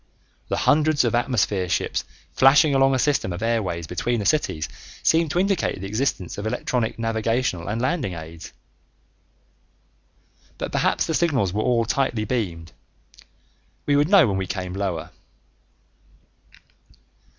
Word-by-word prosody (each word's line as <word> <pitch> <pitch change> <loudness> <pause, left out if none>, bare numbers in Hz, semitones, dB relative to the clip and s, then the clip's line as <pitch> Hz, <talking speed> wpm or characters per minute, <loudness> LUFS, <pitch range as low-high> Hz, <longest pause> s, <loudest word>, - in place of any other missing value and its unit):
The - - -1
hundreds 155 -1 +3
of 120 - 0
atmosphere 105 -7 0
ships - - -1 0.3
flashing 140 +3 +5
along 135 0 +4
a - - +2
system 135 -7 +1
of 90 +5 -5
airways 100 -8 -1
between 90 +9 -2
the 100 - -3
cities 100 - 0 0.4
seemed 165 0 +3
to 160 - -2
indicate 190 - 0
the 95 - -6
existence 100 -4 -2
of 105 - -3
electronic 120 -1 -2
navigational 115 -4 -1
and 105 +3 -2
landing 130 - -1
aids. 80 0 -9 2.1
But - - -4
perhaps - - +1
the 160 - -2
signals 140 - +1
were 105 - 0
all 115 0 +1
tightly 120 -3 0
beamed; 85 -10 -3 1.1
we 145 - +2
would 145 +3 +3
know 195 -5 +7
when 100 -2 -1
we 95 -1 -3
came 90 0 -4
lower. 95 -4 -3
115 Hz, 140 wpm, -23 LUFS, 95-140 Hz, 2.1 s, know